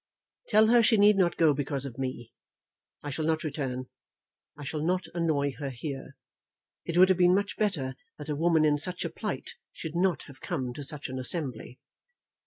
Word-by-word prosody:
"Tell 215 +1 +5
her 235 +2 +5
she 225 0 +4
need 205 +1 +6
not 185 -3 +2
go 160 -3 +5
because 140 -1 -1
of 135 -2 -8
me. 130 -3 -5 0.7
I 145 - -4
shall 155 +3 -3
not 160 +1 0
return. 135 -4 -3 0.7
I 145 - -8
shall 150 +2 -4
not 180 +2 0
annoy 155 -5 +1
her 140 -2 -3
here. 135 +1 -6 0.7
It 170 - -2
would 185 +1 +7
have 185 -1 +3
been 180 0 +6
much 200 0 -1
better 155 -12 -1 0.2
that 150 - -8
a 150 - -1
woman 160 0 +3
in 145 -1 +3
such 180 +4 -2
a - - -3
plight - - -5 0.2
should 160 0 -7
not 180 -1 +1
have 135 -2 -14
come 125 -2 -3
to 145 - -7
such 145 +1 -4
an 130 0 -5
assembly." 130 -3 -2
155 Hz, 195 wpm, -28 LUFS, 135-180 Hz, 0.7 s, would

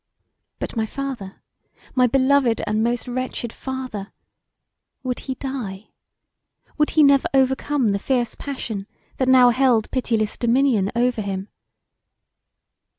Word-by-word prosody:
But - - -5
my 220 -1 0
father; 255 -8 -6 0.5
my 255 -1 +4
beloved 260 -2 +3
and 215 +1 0
most 240 +1 -1
wretched 245 -2 -3
father? 255 -7 -6 0.9
Would 250 -1 -2
he 265 - -5
die? 235 -8 -6 0.9
Would 300 - +3
he 310 - +8
never 280 -1 +5
overcome 265 -2 +2
the 200 - 0
fierce 245 +1 0
passion 225 -8 -5 0.3
that 260 - 0
now 250 -1 +7
held 245 -3 +2
pityless 225 -4 -1
dominion 235 -4 +2
over 240 -1 +1
him? 195 0 -4
250 Hz, 120 wpm, -22 LUFS, 220-265 Hz, 0.9 s, he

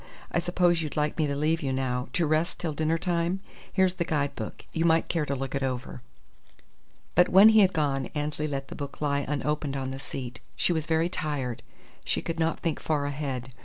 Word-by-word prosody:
I - - +2
suppose 175 -1 +2
you'd 155 -2 -4
like 150 +2 0
me 155 - +3
to 140 - -1
leave 155 +3 +1
you 135 -3 -1
now, 130 -1 -1
to 170 - +2
rest 155 +2 +1
till 160 -3 -1
dinner 155 +2 +1
time? 175 +1 0 0.3
Here's 190 -1 +3
the 175 - -1
guide 145 -3 -1
book. 110 -2 -6
You 165 - 0
might 165 -1 +3
care 160 -4 0
to 140 - 0
look 135 0 -4
it 140 - -1
over." 130 -1 -3 1.1
But 180 +1 +5
when 195 +4 +9
he 220 0 +6
had 190 -3 +6
gone 140 -4 0
Annesley 150 +1 -1
let 135 -2 -4
the - - -7
book 140 -1 -6
lie 140 -1 +1
unopened 145 -1 -1
on 130 -1 -3
the 135 - -6
seat. 125 -3 -6 0.2
She 175 - +2
was 160 -2 -2
very 160 +1 +2
tired. 145 -8 -3 0.4
She - - -1
could 165 0 -3
not 165 0 0
think 165 -3 -1
far 150 -2 0
ahead. 135 -3 -3
150 Hz, 215 wpm, -28 LUFS, 135-165 Hz, 1.1 s, when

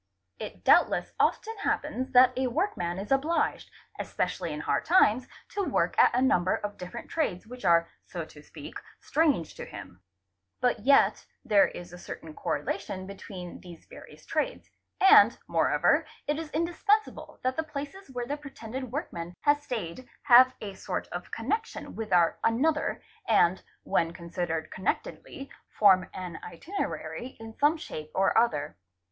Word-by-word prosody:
It - - -8
doubtless - - +4
often 450 +1 +1
happens 260 -9 -2
that 250 0 +7
a 260 0 0
workman 235 - -1
is 200 +5 -6
obliged, 295 +5 +1 0.3
especially - - -2
in - - -4
hard - - 0
times, 255 - +4 0.2
to 405 - -2
work - - 0
at - - +8
a 250 - +3
number 185 -9 +3
of 205 0 -5
different 180 0 -8
trades 215 - -1
which 250 +2 -11
are, 170 -1 +5 0.2
so - - -6
to - - -15
speak, - - -11 0.3
strange 290 - +1
to - - -8
him, 90 - -10 0.6
but 245 -2 +1
yet 275 +6 +4 0.2
there 210 -5 +5
is 175 0 -9
a 175 - -9
certain 160 -2 -9
co - - -6
relation 185 +5 -3
between 190 -2 -9
these 175 -3 -13
various - - -14
trades, - - -2 0.3
and 385 - +7
more - - +2
over - - +3 0.2
it 295 +1 -1
is 325 -2 -6
indispensable 350 +7 0
that 255 0 0
the - - 0
places 305 +4 -7
where 245 -2 -4
the 285 +4 -3
pretended 260 -3 -7
workmen 175 - -5
has 290 0 +3
stayed 240 - -5
have 255 0 +7
a 200 -2 -5
sort - - -4
of - - -6
connection 450 +1 -3
with 220 -2 -5
our 170 -2 +3
another 295 +7 +1 0.2
and, 190 -4 +4 0.2
when 165 0 0
considered 170 -2 -4
connectedly, 270 +7 -4 0.2
form 190 -3 +4
an 180 -3 -7
itinerary 260 - -5
in 225 0 -9
some 295 +6 +3
shape 155 - -7
or 195 - +2
other. 225 -11 +2
235 Hz, 155 wpm, -28 LUFS, 180-290 Hz, 0.6 s, at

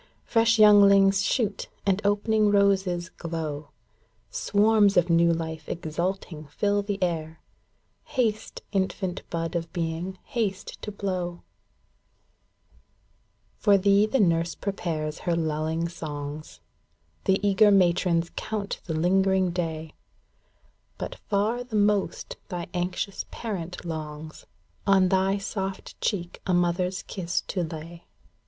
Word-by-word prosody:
Fresh 230 0 +3
younghngs 200 -2 +6
shoot, 200 0 -1 0.2
and 195 0 +2
opening 210 +1 +2
roses 190 -3 +2
glow! 155 -4 -5 0.6
Swarms 210 -1 +3
of 175 0 +3
new 170 0 +5
life 160 -1 -4
exulting 170 -1 -3
fill 205 +7 0
the 200 0 -3
air, 160 -2 -2
ŌĆö - - -38
Haste, 225 -5 -1
infant 190 -2 -1
bud 165 0 -3
of 165 -1 -3
being, 170 +2 -3
haste 205 -5 -3
to 210 - -5
blow! 185 -4 -3 2.2
For 200 -2 +5
thee 200 +2 +4
the 265 +4 +1
nurse 170 -3 +2
prepares 160 -6 -3
her 175 - -1
luUing 160 0 -1
songs. 150 -1 -7 0.6
The 190 0 +3
eager 205 +2 +5
matrons 175 -3 +3
count 210 -2 -4
the 160 - -3
lingering 190 +2 +2
day; 160 -3 -3 1.0
But - - -5 0.2
far 215 +4 +1
the 245 -3 -7
most 205 -1 +1
thy 175 -3 -4
anxious 180 +2 -2
parent 180 -6 -5
longs 155 -1 -7 0.4
On 190 -2 +5
thy 190 +1 +2
soft 195 -1 -5
cheek 175 -5 -2
a 185 - +3
mother's 180 +1 0
kiss 175 -2 -2
to 185 - -1
lay. 165 +1 -7
185 Hz, 120 wpm, -26 LUFS, 165-200 Hz, 2.2 s, younghngs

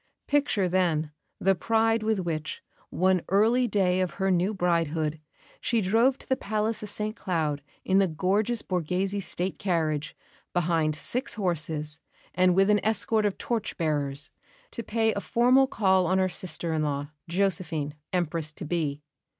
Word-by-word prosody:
Picture, 280 -10 +2
then, 170 -4 +1 0.3
the 195 +1 +3
pride 225 +4 +2
with 220 0 +1
which, 155 -3 -4 0.3
one 185 0 +2
early 225 +6 +3
day 185 -3 +2
of 185 - -2
her 195 -1 +1
new 180 +3 +2
bridehood, 165 -5 0 0.4
she 230 - +1
drove 225 +7 +3
to - - -17
the 260 - +2
Palace 215 -2 -2
of 210 - -5
St 215 +1 -2
Cloud 155 -8 -1 0.2
in 190 +1 +4
the 195 - +4
gorgeous 200 +8 0
Borghese 185 +3 -1
State 180 +2 -4
carriage, 155 -5 -1 0.4
behind 165 -3 +1
six 250 - -1
horses, 160 -6 -3 0.3
and 180 0 +3
with 195 +2 +4
an 210 - +2
escort 220 0 +2
of 200 - -3
torch 230 -3 -3
bearers, 150 -3 -1 0.4
to - - -4
pay 225 0 +1
a 200 - -3
formal 255 +5 +4
call 190 -6 +2
on 185 - +2
her 185 0 +2
sister 170 -2 -2
in 155 - 0
law, 145 0 -2 0.2
Josephine, 170 -5 -1 0.2
Empress 165 -3 -1
to 170 - -7
be. 150 -3 -2
185 Hz, 160 wpm, -27 LUFS, 160-210 Hz, 0.4 s, in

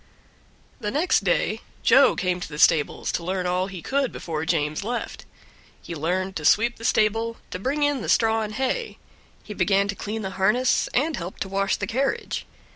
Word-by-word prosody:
The 210 -4 -3
next 305 +11 +2
day - - +1 0.2
Joe - - +6
came 180 -1 -1
to 180 - -6
the 150 - -7
stables 155 -1 +3
to 170 - -2
learn 185 +1 -2
all 180 +1 0
he 185 -4 -8
could 275 -1 0
before 160 -2 -4
James 155 0 0
left. 240 +3 -4 0.5
He 170 - -8
learned 185 +4 -2
to 155 - -6
sweep 235 +9 +3
the 230 - -12
stable, 225 +2 +1
to 185 - -4
bring 280 +8 -1
in 290 -3 +1
the - - -4
straw 225 -1 +3
and 215 0 -4
hay; 440 - -2 0.5
he 210 - -7
began 195 +1 +2
to 200 - -2
clean 215 +2 -4
the 190 - -4
harness, 240 +6 +2
and 300 +5 +1
helped 175 +2 -7
to 195 - -9
wash 195 0 +1
the 205 - -3
carriage. 265 +7 -2
200 Hz, 195 wpm, -24 LUFS, 180-235 Hz, 0.5 s, Joe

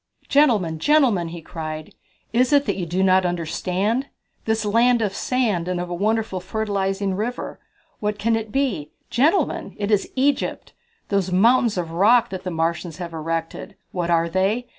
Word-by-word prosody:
"Gentlemen, 215 - +3
gentlemen," 245 - +3
he 165 0 -8
cried, 155 -1 -6 0.4
"is 250 +3 +3
it 285 -1 +4
that - - 0
you 180 -3 -4
do 180 +3 0
not 190 0 +4
understand? 180 - -1 0.4
This 220 -1 0
Land 235 +3 +3
of 210 -4 -1
Sand 215 -9 0
and 180 -1 -1
of 175 0 -4
a - - -1
wonderful 215 +1 0
fertilizing 195 0 -2
river 225 +6 -4 0.4
what 210 -1 -2
can 225 +2 +1
it 220 -1 -4
be? 215 - -1 0.2
Gentlemen, 300 +10 +1
it 205 +1 -2
is 205 -2 +1
Egypt! 275 +2 0 0.4
These 195 -3 0
mountains 230 +3 +4
of 170 -2 -3
rock 215 +8 +4
that 190 -1 -5
the 185 - -3
Martians 165 0 -2
have 175 -2 -6
erected, 165 +4 -4 0.2
what 175 -2 -2
are 170 -1 +3
they? 195 +8 0
195 Hz, 165 wpm, -22 LUFS, 175-230 Hz, 0.4 s, it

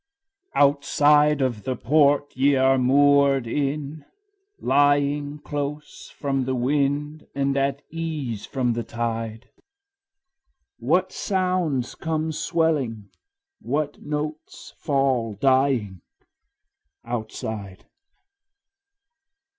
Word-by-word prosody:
II. - - +3
Outside 145 +1 +3
of 120 -5 -1
the 130 +2 -3
port 145 +2 +2
ye 140 +2 +3
are 135 0 +3
moored 140 0 +4
in, 145 +4 -3 0.6
lying 145 +1 +2
Close 145 0 -6
from 135 -2 -2
the 130 0 -1
wind 145 +4 -1
and 140 0 0
at 140 +1 0
ease 150 -10 -4
from 125 -3 -1
the 120 - -2
tide, 115 0 -4 1.3
What - - +1
sounds 180 - -1
come 160 0 -2
swelling, 150 - -1 0.5
what 145 +2 -2
notes 150 +1 -6
fall 130 -6 0
dying 130 -6 +1 1.0
Outside? 110 -4 -5
140 Hz, 90 wpm, -24 LUFS, 125-150 Hz, 1.3 s, moored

